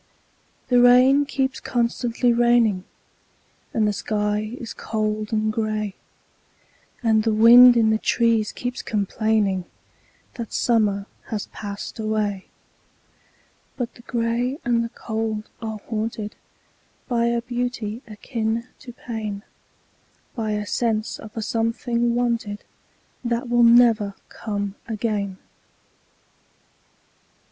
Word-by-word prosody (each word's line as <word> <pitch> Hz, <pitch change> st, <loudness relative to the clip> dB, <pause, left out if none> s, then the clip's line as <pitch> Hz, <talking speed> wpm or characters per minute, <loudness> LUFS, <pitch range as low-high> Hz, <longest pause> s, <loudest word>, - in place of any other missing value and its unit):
The 245 Hz, -1 st, +5 dB
rain 255 Hz, +3 st, +6 dB
keeps 265 Hz, -2 st, -1 dB
constantly 240 Hz, 0 st, 0 dB
raining, 235 Hz, -5 st, +3 dB, 0.9 s
And 215 Hz, -2 st, +1 dB
the 210 Hz, -, +1 dB
sky 210 Hz, +2 st, -2 dB
is 235 Hz, -, -7 dB
cold 215 Hz, -1 st, -2 dB
and 215 Hz, -1 st, 0 dB
gray, 215 Hz, -2 st, -2 dB, 1.1 s
And 220 Hz, -2 st, +4 dB
the 225 Hz, +1 st, +1 dB
wind 240 Hz, +2 st, +9 dB
in 220 Hz, -1 st, +4 dB
the 220 Hz, -, +1 dB
trees 230 Hz, -3 st, +2 dB
keeps 245 Hz, +1 st, -4 dB
complainingThat 210 Hz, +1 st, -3 dB
summer 210 Hz, -4 st, +1 dB, 0.2 s
has 215 Hz, -2 st, -3 dB
passed 205 Hz, +1 st, -7 dB
away;—But 215 Hz, +3 st, -7 dB
the -, -, -16 dB
gray 240 Hz, +2 st, -1 dB
and 235 Hz, -1 st, +2 dB
the 230 Hz, -, -4 dB
cold 220 Hz, -2 st, -4 dB
are 220 Hz, -2 st, -4 dB
hauntedBy 225 Hz, +2 st, -4 dB
a 235 Hz, -, -3 dB
beauty 240 Hz, -2 st, -3 dB
akin 225 Hz, +2 st, -3 dB
to 245 Hz, -2 st, -11 dB
pain,—By 220 Hz, 0 st, -8 dB
a 210 Hz, 0 st, -2 dB
sense 220 Hz, 0 st, -1 dB
of 220 Hz, +1 st, -11 dB
a 225 Hz, -, -2 dB
something 235 Hz, +1 st, 0 dB
wanted, 235 Hz, -4 st, -1 dB, 0.6 s
That 235 Hz, 0 st, -2 dB
never 235 Hz, -2 st, +6 dB
will 200 Hz, -1 st, -6 dB
come 205 Hz, -2 st, -4 dB
again. 210 Hz, -4 st, -2 dB
225 Hz, 105 wpm, -23 LUFS, 215-240 Hz, 1.1 s, wind